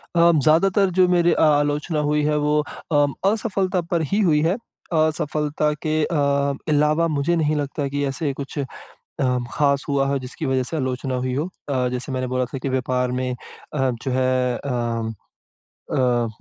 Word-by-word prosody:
अब 170 Hz, -2 st, +5 dB
ज़्यादातर 190 Hz, +5 st, +4 dB
जो 185 Hz, -1 st, +6 dB
मेरी 175 Hz, -1 st, +3 dB
अ, -, -, 0 dB
आलोचना 150 Hz, +1 st, +2 dB
हुई 150 Hz, 0 st, +1 dB
है 150 Hz, 0 st, +1 dB
वो 150 Hz, +1 st, +2 dB, 0.3 s
उम, 145 Hz, -2 st, +3 dB, 0.2 s
असफलता 195 Hz, -5 st, 0 dB
पर 170 Hz, -2 st, +2 dB
ही 205 Hz, -, +2 dB
हुई 155 Hz, -6 st, +3 dB
है। 165 Hz, +5 st, +2 dB, 0.4 s
असफलता 150 Hz, -1 st, +1 dB
के 155 Hz, 0 st, +1 dB
अ, 170 Hz, -, -1 dB, 0.5 s
अलावा 150 Hz, +2 st, +3 dB
मुझे 155 Hz, +2 st, 0 dB
नहीं 155 Hz, -2 st, +1 dB
लगता 145 Hz, 0 st, -2 dB
कि 145 Hz, +1 st, -2 dB
ऐसे 140 Hz, +1 st, -2 dB
कुछ 140 Hz, +2 st, -7 dB, 0.4 s
उम, 125 Hz, -2 st, -2 dB
ख़ास 140 Hz, -2 st, +2 dB
हुआ 140 Hz, -1 st, +1 dB
हो 140 Hz, 0 st, +1 dB
जिसकी 125 Hz, 0 st, -6 dB
वजह 130 Hz, -1 st, +1 dB
से 160 Hz, -, -4 dB
आलोचना 130 Hz, -2 st, -2 dB
हुई 125 Hz, 0 st, -1 dB
हो। 145 Hz, +5 st, -1 dB, 0.2 s
अ, 130 Hz, -2 st, +1 dB
जैसे 125 Hz, +2 st, -3 dB
मैंने 130 Hz, 0 st, -1 dB
बोला 130 Hz, 0 st, 0 dB
था 135 Hz, -, -3 dB
कि 135 Hz, -, -1 dB
व्यापार 125 Hz, -1 st, 0 dB
में 125 Hz, 0 st, -1 dB, 0.4 s
अ, 135 Hz, -2 st, +1 dB
जो 135 Hz, -, -2 dB
है 130 Hz, -1 st, +1 dB
अ 115 Hz, -4 st, -2 dB, 0.8 s
अ, 120 Hz, -2 st, +2 dB
145 Hz, 175 wpm, -22 LUFS, 130-155 Hz, 0.8 s, जो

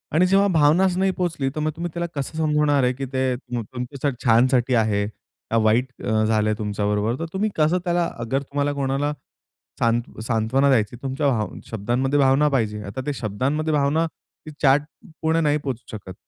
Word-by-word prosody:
आणि 175 Hz, +3 st, +5 dB
जेव्हा 195 Hz, +2 st, +4 dB
भावनाच 170 Hz, +4 st, +4 dB
नाही 190 Hz, 0 st, +2 dB
पोहोचली, 165 Hz, -7 st, -1 dB
तर -, -, -2 dB
मग 155 Hz, +1 st, 0 dB
तुम्ही 170 Hz, +1 st, -4 dB
त्याला 170 Hz, 0 st, -2 dB
कसं 140 Hz, +3 st, -4 dB
समजवणार 150 Hz, -3 st, +2 dB
आहे? 125 Hz, 0 st, +2 dB
की 135 Hz, +2 st, -5 dB
ते 130 Hz, -1 st, +1 dB
तुमच्या 125 Hz, +3 st, -4 dB
छानसाठी 125 Hz, +2 st, +4 dB
आहे, 105 Hz, -3 st, +2 dB, 0.5 s
का 115 Hz, -, +3 dB
वाईट 115 Hz, +3 st, +3 dB, 0.2 s
अ, 110 Hz, 0 st, +1 dB
झालं 110 Hz, -1 st, +2 dB
तुमच्याबरोबर? 105 Hz, +1 st, -1 dB
तर 165 Hz, -, -2 dB
तुम्ही 205 Hz, +3 st, 0 dB
कसं 155 Hz, +3 st, +3 dB
त्याला 175 Hz, -1 st, +1 dB
अगर 120 Hz, +4 st, -1 dB
तुम्हाला 145 Hz, +1 st, -2 dB
कोणाला 140 Hz, +1 st, -1 dB, 0.7 s
सांत 115 Hz, 0 st, 0 dB
सांत्वना 115 Hz, +4 st, +1 dB
द्यायची. 115 Hz, -3 st, +1 dB
तुमच्या 135 Hz, +2 st, -1 dB
भा 110 Hz, -5 st, 0 dB, 0.2 s
शब्दांमध्ये 120 Hz, +6 st, 0 dB
भावना 135 Hz, +2 st, +4 dB
पाहिजे. 110 Hz, -6 st, -1 dB
आता 100 Hz, +6 st, -5 dB
त्या 145 Hz, -, -1 dB
शब्दांमध्ये 130 Hz, +9 st, -1 dB
भावना 150 Hz, +3 st, +2 dB
ती 155 Hz, -1 st, -15 dB
चॅट 140 Hz, +1 st, +5 dB, 0.4 s
पुर्ण 160 Hz, +1 st, +2 dB
नाही 150 Hz, -1 st, +2 dB
पोहचू 130 Hz, -6 st, -6 dB
शकत. 95 Hz, -3 st, -9 dB
135 Hz, 175 wpm, -23 LUFS, 115-150 Hz, 0.7 s, आणि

